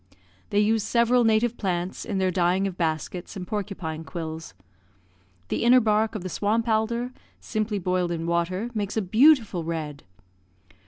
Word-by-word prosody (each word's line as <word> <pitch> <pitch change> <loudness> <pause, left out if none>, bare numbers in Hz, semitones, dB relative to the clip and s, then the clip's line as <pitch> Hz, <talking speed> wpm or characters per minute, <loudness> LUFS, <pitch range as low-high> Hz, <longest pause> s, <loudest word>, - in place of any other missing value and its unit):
They 205 - -1
use 215 +1 +3
several 240 +2 +3
native 225 +1 +2
plants 180 -2 -2
in 205 -4 -2
their 190 -1 +1
dyeing 180 +2 +2
of 190 -3 -3
baskets 170 +2 -3
and 185 -2 -5
porcupine 185 -6 -4
quills. 160 - -6 0.9
The - - -1
inner 245 +2 +7
bark 220 -1 +1
of 205 - -4
the - - -3
swamp 220 +6 0
alder, 235 +2 0 0.3
simply 215 -1 -2
boiled 180 -1 0
in 165 -1 -3
water, 175 +7 -1
makes 210 -1 -3
a - - +3
beautiful 220 - +4
red. 155 -3 -4
195 Hz, 155 wpm, -25 LUFS, 175-220 Hz, 0.9 s, inner